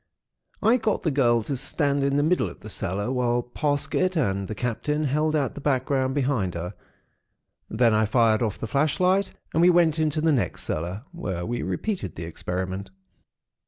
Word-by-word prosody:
I 225 Hz, +4 st, +5 dB
got 220 Hz, -3 st, -1 dB
the 160 Hz, -, +1 dB
girl 120 Hz, -5 st, +3 dB
to 140 Hz, -, -3 dB
stand 140 Hz, +2 st, 0 dB
in 140 Hz, 0 st, +1 dB
the 145 Hz, -, +3 dB
middle 160 Hz, -, +2 dB
of 85 Hz, -, -13 dB
the -, -, -8 dB
cellar, 100 Hz, +7 st, -2 dB
whilst 120 Hz, -1 st, 0 dB
Parsket 155 Hz, +5 st, 0 dB
and 100 Hz, -8 st, 0 dB
the 110 Hz, -, -5 dB
Captain 135 Hz, +7 st, -1 dB
held 155 Hz, +2 st, +1 dB
out 140 Hz, -4 st, 0 dB
the 145 Hz, -, -8 dB
background 130 Hz, -1 st, 0 dB
behind 125 Hz, -11 st, 0 dB
her. 85 Hz, +1 st, -4 dB, 1.0 s
Then 115 Hz, 0 st, +3 dB
I 110 Hz, 0 st, +3 dB
fired 110 Hz, 0 st, +3 dB
off 110 Hz, -4 st, -1 dB
the -, -, -4 dB
flashlight, 180 Hz, -, +2 dB, 0.2 s
and 165 Hz, -, +3 dB
we 175 Hz, -, +7 dB
went 170 Hz, -3 st, +4 dB
into 155 Hz, -1 st, +1 dB
the 160 Hz, +1 st, +3 dB
next 115 Hz, -, 0 dB
cellar, 90 Hz, +7 st, -3 dB
where 95 Hz, -, -4 dB
we 120 Hz, +1 st, -2 dB
repeated 95 Hz, -, -3 dB
the 85 Hz, -, -6 dB
experiment. 95 Hz, +3 st, -4 dB
130 Hz, 180 wpm, -25 LUFS, 105-155 Hz, 1.0 s, we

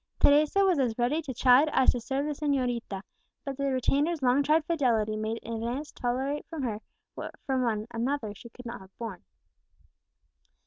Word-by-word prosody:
Teresa 300 Hz, +7 st, +5 dB
was 365 Hz, -6 st, +3 dB
as 240 Hz, -4 st, 0 dB
ready 255 Hz, +7 st, +1 dB
to 290 Hz, -4 st, -6 dB
chide 255 Hz, +4 st, +5 dB
as 260 Hz, -, +5 dB
to 245 Hz, -, -4 dB
serve 270 Hz, +4 st, -1 dB
the 300 Hz, -, -1 dB
señorita; 250 Hz, -9 st, -1 dB, 0.4 s
but 275 Hz, -1 st, -3 dB
the 275 Hz, +1 st, -1 dB
retainer's 285 Hz, +5 st, +1 dB
long 255 Hz, +2 st, +4 dB
tried 305 Hz, +2 st, +3 dB
fidelity 240 Hz, -10 st, +1 dB
made 215 Hz, +1 st, -2 dB
Inez 235 Hz, +6 st, -4 dB
tolerate 265 Hz, +4 st, -2 dB
from 320 Hz, -4 st, -5 dB
her 220 Hz, -3 st, -2 dB, 0.3 s
what -, -, -7 dB
from 240 Hz, -6 st, 0 dB
another 235 Hz, -2 st, -2 dB
she 235 Hz, +3 st, -12 dB
could 250 Hz, +2 st, -13 dB
not 235 Hz, -1 st, -6 dB
have 190 Hz, 0 st, -17 dB
borne. 220 Hz, -6 st, -6 dB
255 Hz, 170 wpm, -28 LUFS, 230-285 Hz, 0.4 s, Teresa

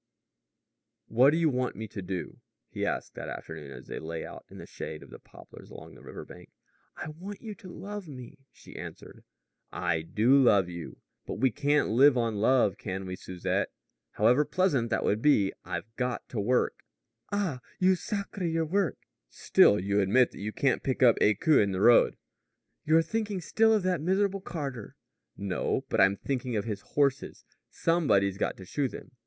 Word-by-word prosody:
"What 125 Hz, +4 st, +5 dB
do 155 Hz, -, +1 dB
you 165 Hz, -1 st, +3 dB
want 125 Hz, -2 st, -1 dB
me 110 Hz, -, -6 dB
to 100 Hz, -2 st, -6 dB
do?" 90 Hz, 0 st, -5 dB, 0.3 s
he -, -, -2 dB
asked -, -, -3 dB
that -, -, -7 dB
afternoon 80 Hz, -3 st, -8 dB
as -, -, -10 dB
they -, -, -6 dB
lay 80 Hz, +1 st, -5 dB
out -, -, -11 dB
in -, -, -12 dB
the -, -, -9 dB
shade 75 Hz, -1 st, -7 dB
of -, -, -16 dB
the -, -, -11 dB
poplars -, -, -15 dB
along -, -, -11 dB
the -, -, -15 dB
river -, -, -9 dB
bank. -, -, -14 dB, 0.5 s
"I -, -, -6 dB
want 185 Hz, +7 st, -8 dB
you 220 Hz, -2 st, -6 dB
to 200 Hz, -3 st, -13 dB
love 205 Hz, +1 st, -7 dB
me," 135 Hz, -1 st, -11 dB
she -, -, -16 dB
answered. -, -, -10 dB, 0.5 s
"I 80 Hz, -1 st, -1 dB
do 115 Hz, -, +3 dB
love 100 Hz, -7 st, +4 dB
you. 85 Hz, -2 st, -8 dB, 0.3 s
But -, -, -4 dB
we 130 Hz, +3 st, +2 dB
can't 145 Hz, +6 st, +1 dB
live 130 Hz, +4 st, +5 dB
on 115 Hz, -3 st, 0 dB
love 120 Hz, -5 st, +3 dB
can 95 Hz, +1 st, -5 dB
we, 90 Hz, 0 st, -5 dB
Susette? 90 Hz, -1 st, -2 dB, 0.4 s
however 120 Hz, +7 st, +4 dB
pleasant 145 Hz, -9 st, +1 dB
that 115 Hz, -, 0 dB
would 105 Hz, +2 st, +1 dB
be. 105 Hz, -10 st, +3 dB
I've 95 Hz, +5 st, -6 dB
got 125 Hz, -1 st, -2 dB
to 115 Hz, -, -4 dB
work." 125 Hz, +5 st, +1 dB, 0.5 s
"Ah, 195 Hz, -10 st, -1 dB, 0.2 s
your 185 Hz, +1 st, +4 dB
sacré 180 Hz, -4 st, -2 dB
work!" 195 Hz, +2 st, 0 dB, 0.3 s
"Still, 100 Hz, +10 st, +4 dB
you'll 100 Hz, +2 st, +1 dB
admit 120 Hz, +6 st, +3 dB
that -, -, -11 dB
you 105 Hz, +1 st, -3 dB
can't 135 Hz, +5 st, +1 dB
pick 130 Hz, -1 st, 0 dB
up 120 Hz, -3 st, +6 dB
écus 110 Hz, -, +4 dB
in 100 Hz, -2 st, 0 dB
the 95 Hz, -, -2 dB
road." 120 Hz, +4 st, +5 dB, 0.7 s
"You're 160 Hz, +2 st, +4 dB
thinking 210 Hz, +2 st, -2 dB
still 220 Hz, +5 st, +2 dB
of 215 Hz, -3 st, +2 dB
that 180 Hz, -4 st, 0 dB
miserable 195 Hz, +3 st, +1 dB
carter." 140 Hz, -, -6 dB, 0.4 s
"No; 100 Hz, -2 st, -2 dB
but -, -, +2 dB
I'm 95 Hz, +1 st, +5 dB
thinking 130 Hz, -3 st, -3 dB
of 105 Hz, -, -1 dB
his 105 Hz, -3 st, -4 dB
horses. 140 Hz, -2 st, -1 dB, 0.2 s
Somebody's 105 Hz, -, +1 dB
got -, -, -1 dB
to 95 Hz, -, -10 dB
shoe 140 Hz, +8 st, -1 dB
them. 130 Hz, -, -10 dB
125 Hz, 185 wpm, -28 LUFS, 100-165 Hz, 0.7 s, up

